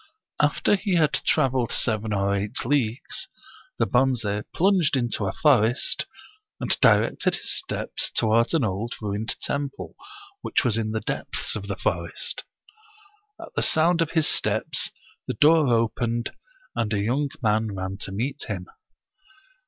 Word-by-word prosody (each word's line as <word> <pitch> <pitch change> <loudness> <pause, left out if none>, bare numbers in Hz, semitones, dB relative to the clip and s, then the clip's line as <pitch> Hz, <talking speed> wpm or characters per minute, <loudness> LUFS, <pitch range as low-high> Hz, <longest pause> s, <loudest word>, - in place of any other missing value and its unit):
After 145 +7 +3
he 195 -2 -1
had 155 -3 +3
traveled 130 -5 +1
seven 110 -2 0
or 100 0 +1
eight 105 +5 -2
leagues, 125 -3 0 0.5
the - - +2
Bonze 120 -5 +1
plunged 180 -6 +3
into 120 -5 -1
a - - 0
forest, 125 -2 +2 0.5
and - - +1
directed - - +4
his - - -4
steps - - -3
toward 115 +6 +2
an 155 - +2
old 110 +3 -2
ruined 105 +1 -2
temple, 140 -1 -4 0.5
which - - 0
was 115 -4 +3
in 110 -1 -1
the 110 0 -2
depths - - -3
of 100 -2 -5
the 100 - -2
forest. 85 0 -2 1.0
At - - -10
the - - +1
sound 165 +2 +3
of 165 - -1
his 160 -2 +3
steps - - 0 0.4
the - - -2
door 155 0 +5
opened, 115 0 0 0.4
and 115 -2 -1
a 100 - +1
young 130 +8 0
man 110 -1 +1
ran 95 +1 -4
to 100 - -5
meet 130 +8 -3
him. 95 -4 -4
115 Hz, 145 wpm, -25 LUFS, 105-145 Hz, 1.0 s, door